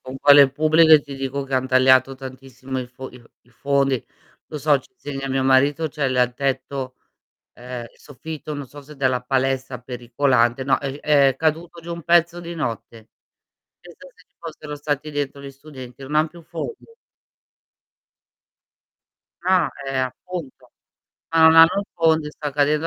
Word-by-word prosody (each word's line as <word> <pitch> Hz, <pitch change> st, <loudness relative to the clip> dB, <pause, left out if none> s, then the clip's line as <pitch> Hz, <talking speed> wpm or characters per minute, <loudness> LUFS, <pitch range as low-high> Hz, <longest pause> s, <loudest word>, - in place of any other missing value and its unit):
Con 130 Hz, +1 st, -9 dB
quelle 140 Hz, -1 st, +7 dB
pubbliche 155 Hz, +1 st, +5 dB
ti 140 Hz, -1 st, -9 dB
dico 135 Hz, +1 st, -4 dB
che 135 Hz, -, -11 dB
han 130 Hz, 0 st, 0 dB
tagliato 130 Hz, 0 st, +4 dB
tantissimo 130 Hz, 0 st, -8 dB
i 125 Hz, -, -6 dB
fo 130 Hz, +1 st, -10 dB
i 125 Hz, -, -14 dB
f 115 Hz, -, -21 dB, 0.2 s
i 120 Hz, -, -28 dB
fondi. 135 Hz, 0 st, 0 dB, 0.4 s
Lo 155 Hz, -, -8 dB
so 145 Hz, 0 st, +2 dB
ci 130 Hz, -, -19 dB
insegna 135 Hz, -1 st, -6 dB
mio 135 Hz, 0 st, 0 dB
marito 140 Hz, +4 st, +2 dB
c'è 145 Hz, -2 st, -2 dB
l 130 Hz, -, -2 dB
il 125 Hz, -1 st, +2 dB
tetto, 135 Hz, -1 st, -3 dB, 0.6 s
ehm, 125 Hz, -1 st, -8 dB
soffitto 150 Hz, +2 st, -9 dB
non 145 Hz, -2 st, -6 dB
so 145 Hz, +3 st, -13 dB
se 150 Hz, +2 st, -14 dB
della 130 Hz, -2 st, 0 dB
palestra 130 Hz, -1 st, -1 dB
pericolante, 125 Hz, 0 st, 0 dB
no 135 Hz, -, +2 dB
è 135 Hz, -1 st, -4 dB
g 145 Hz, -, -10 dB
è 140 Hz, -3 st, +3 dB
caduto 165 Hz, +2 st, -2 dB
giù 170 Hz, +1 st, -8 dB
un 170 Hz, -1 st, -8 dB
pezzo 170 Hz, +1 st, +3 dB
di 170 Hz, 0 st, -8 dB
notte. 115 Hz, -5 st, -6 dB, 0.7 s
Pensa 175 Hz, +10 st, -15 dB
se 180 Hz, -, -22 dB
ci -, -, -50 dB
fossero 155 Hz, -3 st, -8 dB
stati 145 Hz, +1 st, -3 dB
dentro 145 Hz, -1 st, -4 dB
gli 140 Hz, 0 st, -9 dB
studenti, 135 Hz, -3 st, -12 dB
non 145 Hz, +3 st, -5 dB
han 155 Hz, +1 st, +3 dB
più 170 Hz, -, -14 dB
fondi. 170 Hz, -, -7 dB, 2.6 s
Ah, 180 Hz, -2 st, +2 dB, 0.2 s
eh, 135 Hz, -, -3 dB
appunto, 130 Hz, +4 st, -6 dB, 0.6 s
ma 165 Hz, -, +2 dB
non 160 Hz, 0 st, +7 dB
hanno 165 Hz, 0 st, +9 dB
un 200 Hz, -, 0 dB
fondo 160 Hz, -2 st, +2 dB
e -, -, -6 dB
sta 150 Hz, -1 st, -6 dB
cadendo 150 Hz, +2 st, +1 dB
140 Hz, 175 wpm, -21 LUFS, 130-155 Hz, 2.6 s, hanno